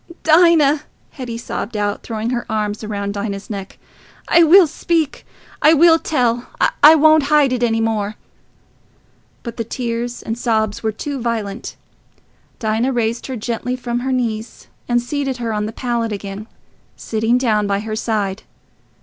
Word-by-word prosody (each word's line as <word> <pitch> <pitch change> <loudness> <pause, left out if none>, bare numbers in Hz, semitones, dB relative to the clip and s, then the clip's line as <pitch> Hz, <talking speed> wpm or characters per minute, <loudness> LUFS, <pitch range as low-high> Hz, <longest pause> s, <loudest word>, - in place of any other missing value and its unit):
'..." 340 - -18
"Dinah," 315 -3 +5 0.3
Hetty 245 -4 -6
sobbed 230 -1 -5
out, 205 0 -1
throwing 225 +1 -4
her 240 -1 -1
arms 210 0 -2
round 200 -1 -3
Dinah's 200 0 -5
neck, 195 -2 -7 0.5
"I 340 - +5
will 345 +3 +7
speak... 320 -1 -2 0.3
I 315 +2 +6
will 330 +1 +6
tell... 245 -6 0 0.3
I 305 +2 +9
won't 310 -1 +5
hide 295 -4 +4
it 250 - -2
any 225 -2 +1
more." 215 -2 -1 1.3
But 235 -2 -7
the 230 - -1
tears 240 0 -4
and 225 - -3
sobs 220 -4 0
were 220 - -1
too 275 +5 -5
violent. 225 -2 -3 0.8
Dinah 225 +3 0
raised 235 -1 -1
her 260 - -4
gently 240 +2 -3
from 240 -1 -3
her 260 +2 -2
knees 230 -3 -3 0.2
and 240 0 +3
seated 270 +1 -3
her 230 -2 -3
on 210 0 -1
the - - -5
pallet 235 -1 -2
again, 200 +1 -6 0.5
sitting 225 +2 0
down 215 -5 +1
by 200 0 0
her 215 0 -4
side. 210 -3 -2
235 Hz, 160 wpm, -19 LUFS, 215-265 Hz, 1.3 s, I